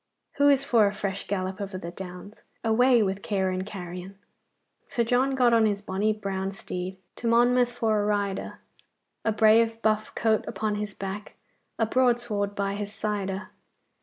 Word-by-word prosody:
'Who 285 0 +5
is 275 -1 +4
for 230 -6 +4
a 200 - -1
fresh 195 -1 -4
gallop 190 0 -2
over 195 -1 -4
the 170 -2 -6
Downs? 180 +3 -9 0.2
Away 240 +1 +4
with 195 0 -2
care 190 -2 0
and 185 0 -2
carrion! 185 -1 -8 0.7
"Sir 245 -4 0
John 255 +3 +2
got 245 -2 +4
on 225 -1 +5
his 205 -1 0
bonny 205 +2 0
brown 195 -2 -3
steed, 185 -1 -5 0.2
To 235 - -3
Monmouth 245 +1 +4
for 225 -3 +1
to - - +1
ride 205 -2 0
a. - - -8 0.7
A 220 - +2
brave 225 +1 +4
buff 215 0 +1
coat 220 -2 +2
upon 215 -1 -2
his 210 -1 -4
back, 195 +2 -6 0.4
A 225 - +2
broadsword 235 -4 +1
by 200 -1 -1
his 205 0 -4
side 210 -2 -2
a. 190 +2 -5
210 Hz, 175 wpm, -27 LUFS, 195-230 Hz, 0.7 s, Who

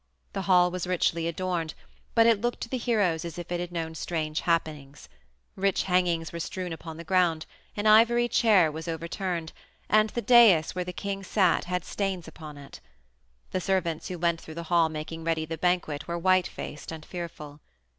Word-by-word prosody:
The - - -2
hall 180 -1 +5
was 180 0 -4
richly 170 -2 0
adorned, 170 -2 -2 0.4
but 230 -1 +6
it 230 -3 +4
looked 240 +1 -2
to - - -5
the 260 - -2
heroes 205 -9 +1
as 170 0 -7
if 175 0 -7
it 175 - -1
had 175 0 -4
known 165 -2 -4
strange 155 -1 -3
happenings; 150 -4 -2 0.5
rich 195 0 +1
hangings 175 -3 0
were 170 - -5
strewn 180 +1 -4
upon 160 0 -8
the 170 - -7
ground, 170 -2 +1 0.3
an 205 - -2
ivory 235 +3 +5
chair 205 -8 +4
was 160 +2 -7
overturned, 170 +1 -3 0.3
and 215 +1 +4
the 235 +2 -4
dais 225 -10 +6
where 180 - -2
the 180 - -5
king 195 +2 -4
sat 190 -2 +2
had 180 0 -2
stains 190 -4 -3
upon 155 -2 -10
it. 140 - -12 0.7
The 185 - -1
servants 180 -4 -1
who 180 - -5
went 170 0 0
through 160 - -10
the 170 - -5
hall 165 -2 +4
making 160 +1 -6
ready 160 -1 0
the 165 +1 -4
banquet 175 -5 0
were 170 0 -2
white 185 +1 +3
faced 150 - -8
and 160 -1 -8
fearful. 155 -4 -8
175 Hz, 190 wpm, -27 LUFS, 160-185 Hz, 0.7 s, but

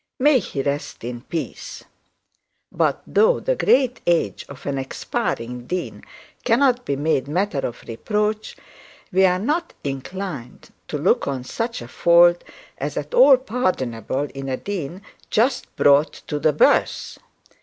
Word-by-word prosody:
May 280 0 +4
he 140 - -4
rest 140 -3 -3
in 120 0 -5
peace! 160 +5 -6 0.9
But - - 0
though 475 +3 +3
the - - 0
great 255 - +2
age 170 -1 +1
of 140 - -11
an 140 -1 -2
expiring 125 -2 -3
dean 180 +3 -4 0.4
cannot 250 +1 +3
be 140 - -1
made 140 -2 0
matter 175 0 -1
of 120 -3 -5
reproach, 210 - -2 0.5
we 190 +1 +4
are 180 0 +2
not 305 - -2
inclined 140 -1 -6 0.2
to - - -3
look - - +2
on 135 -3 -2
such 230 - -4
a - - -10
fault 175 +5 +5 0.4
as - - -4
at - - -4
all 485 - +8
pardonable 145 - -2
in 135 0 -5
a 130 - -1
dean 185 -1 -5 0.3
just 250 +3 0
brought 145 +2 +4
to 150 - -3
the 155 - +3
birth. 150 - +2
170 Hz, 145 wpm, -22 LUFS, 135-230 Hz, 0.9 s, all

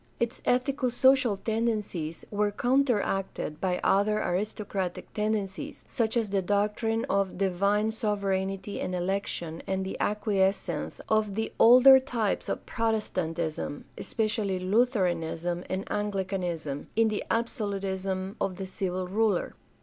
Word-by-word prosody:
Its 235 0 -1
ethico 255 0 +1
social 260 -4 +4
tendencies 210 -8 -2
were 210 0 +1
counter 250 +1 +2
acted 190 -5 -3
by 180 -2 0
other 210 +2 +3
aristocratic 195 -1 -3
tendencies 210 +5 -2
— - - -30
such 230 -2 0
as 220 -4 0
the 195 -1 +2
doctrine 210 +4 0
of 195 -2 0
divine 200 +3 +1
sovereignty 195 -2 -2
and 185 - -2
election 175 -3 -2
and 190 0 -1
the 190 - -4
acquiescence 205 -2 0
of 215 -2 +1
the 220 +1 -2
older 255 +3 +9
types 235 -6 -1
of - - -3
Protestantism, 170 -9 -2
especially 215 -4 -1
Lutheranism 180 -5 0
and 190 +1 -2
Anglicanism, 185 -8 -2
in 225 0 +4
the 215 - -2
absolutism 195 -4 -2
of 185 - 0
the 190 +1 -5
civil 185 -1 -3
ruler. 205 -1 +1
200 Hz, 125 wpm, -28 LUFS, 185-220 Hz, -, older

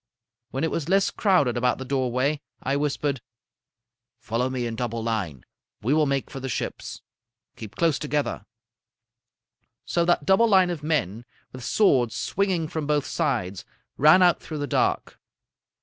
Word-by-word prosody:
When 135 - -3
it 160 - 0
was 165 0 -3
less 195 +1 +3
crowded 175 - +2
about 125 +1 +1
the 130 - -7
doorway, 130 +2 0 0.2
I 135 +2 0
whispered: 145 -2 -1 1.0
"'Follow 115 +3 -2
me 130 -2 -2
in 115 -1 -3
double 115 -1 -3
line. 100 - -3 0.4
We 125 +6 +2
will 155 -1 +3
make 140 -1 -2
for 135 - -6
the 135 0 -5
ships. - - -5 0.5
Keep 110 -3 -10
close 160 -5 +1
together.' 145 -7 -2 1.4
"So 170 - +1
that 170 -4 +2
double 195 +8 +4
line 190 -4 +4
of 165 -4 -5
men, 120 - -1 0.3
with 130 -1 -9
swords 125 - +2
swinging 185 -5 -1
from 155 -1 -4
both 150 -2 +1
sides, 120 - -2 0.3
ran 155 +6 +6
out 175 -1 +4
through 155 - -6
the 145 - -2
dark. - - -1
140 Hz, 155 wpm, -25 LUFS, 120-160 Hz, 1.4 s, ran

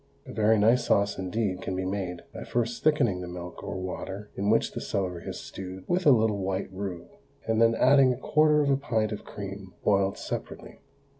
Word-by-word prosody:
A - - -9
very 110 +1 +3
nice 115 +4 +4
sauce 100 -1 +2
indeed 95 0 -2
can 95 - -3
be 95 0 -2
made 95 -2 -3
by - - -6
first 120 0 -2
thickening 130 -12 +2
the 90 - -6
milk 90 0 -8
or - - -4
water 95 +2 -6
in 100 +1 -1
which 115 - +3
the - - -5
celery 90 -4 -3
is - - -5
stewed 95 0 -8
with 175 -1 +1
a - - +9
little 110 -4 +3
white 95 0 -3
roux, 95 -3 -5 0.4
and 115 0 +1
then 115 0 +5
adding 135 +1 +5
a 125 - -2
quarter 150 +2 +3
of 140 - +2
a 135 - +3
pint 115 -5 -1
of 105 - -5
cream 100 -2 -8
boiled 100 -1 +2
separately. - - -6
100 Hz, 205 wpm, -27 LUFS, 95-115 Hz, 0.4 s, a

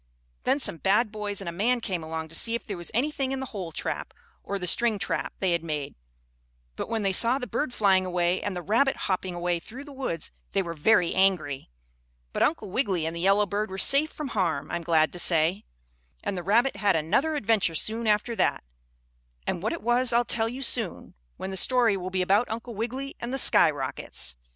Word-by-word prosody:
Then 280 - +2
some 170 - 0
bad 205 - +2
boys 210 -2 -2
and 195 - -7
a - - -2
man 230 +8 +1
came 190 -7 -3
along 160 0 -5
to - - -14
see 230 +5 +2
if 235 - -5
there 205 - -4
was 175 -1 -6
anything 270 +2 0
in 270 - -2
the 265 - -3
hole 185 -5 -5
trap, - - -4 0.3
or 200 - -3
the 180 - -4
string 225 +4 +3
trap - - -2
they 190 -2 0
had 170 -1 0
made; 150 -4 -4 0.8
but - - -5
when 225 -2 -1
they 195 - +2
saw 235 +7 +3
the 260 - -4
bird 295 +1 -2
flying 195 -5 +3
away 180 0 0
and 205 -2 -3
the 175 - -5
rabbit 235 - +2
hopping 185 -1 -2
away 175 0 -1
through 245 +10 -10
the 285 -1 -11
woods 255 - -4 0.2
they 195 - +2
were 170 -2 -5
very 175 +2 +3
angry. 180 - +1 0.6
But - - -2
Uncle 220 - +1
Wiggily 190 - 0
and 165 +1 -3
the - - -5
yellow 195 +3 +3
bird 205 +1 -2
were 190 - -6
safe 280 +9 +4
from 300 -3 -6
harm, 175 -10 -1
I'm 170 0 -2
glad 160 -2 +2
to 175 - -6
say. 170 +4 +2 0.6
And 200 - -2
the 180 - -3
rabbit 230 +9 +2
had 200 -3 +2
another 210 - +1
adventure 215 - +1
soon 225 +7 0
after 210 +3 +1
that, - - +1 0.8
and 170 - -2
what 215 - -1
it 335 - -5
was 240 +1 +3
I'll 240 +1 +3
tell 225 -1 +1
you 260 +3 -5
soon, 230 -6 +1 0.2
when 190 - -5
the 190 - -2
story 240 -1 +3
will 185 -1 -4
be 185 0 0
about 200 +6 +2
Uncle 230 +2 -5
Wiggily 250 +6 -4
and 235 - -5
the 270 - -1
skyrockets. 135 - +2
200 Hz, 215 wpm, -26 LUFS, 175-235 Hz, 0.8 s, safe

